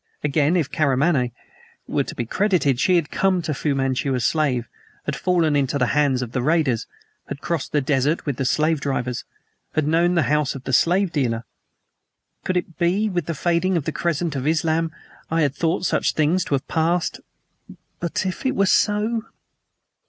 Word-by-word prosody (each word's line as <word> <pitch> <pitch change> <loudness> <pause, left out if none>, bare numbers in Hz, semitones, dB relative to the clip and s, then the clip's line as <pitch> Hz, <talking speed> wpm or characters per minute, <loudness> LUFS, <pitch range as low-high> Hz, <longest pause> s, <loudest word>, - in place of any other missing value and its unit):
Again, 150 +3 +2
if 165 -6 +1
Karamaneh 140 -3 +2 0.6
were - - 0
to - - -8
be 120 - -2
credited, 170 - +1
she 180 +6 +3
had 165 -4 0
come 185 0 +1
to 155 - -2
Fu 145 0 -1
Manchu 135 0 0
a - - 0
slave; 130 -3 +1 0.4
had - - -2
fallen 170 -5 +1
into 140 0 +1
the 125 - +2
hands 140 -3 +2
of 120 - -7
the 125 - -1
raiders; 145 -5 +1 0.4
had - - -6
crossed 155 -1 -3
the 150 - +2
desert 145 +3 0
with 140 -5 -2
the 135 - -1
slave 155 +2 +1
drivers; 125 -3 -2 0.5
had 155 -1 +1
known 170 +3 +3
the 170 - +3
house 150 -2 +1
of 135 - -8
the 135 - -4
slave 180 +6 +3
dealer. 120 -8 -1 1.0
Could 185 - 0
it 170 -2 -4
be? 190 +5 +2
With 175 -5 -2
the 165 - -2
fading 175 +4 +1
of 150 - -2
the 160 - -1
crescent 170 -1 -1
of 135 +1 -2
Islam 160 +1 +1 0.4
I 165 0 +2
had 140 -2 +1
thought 170 +4 0
such - - +1
things 160 +4 +2
to 140 - +1
have 130 - -4
passed. 165 +2 0 0.8
But 170 +2 -2
if 185 - -3
it 265 - 0
were 195 - +3
so? 215 +3 +2
155 Hz, 190 wpm, -22 LUFS, 135-175 Hz, 1.0 s, she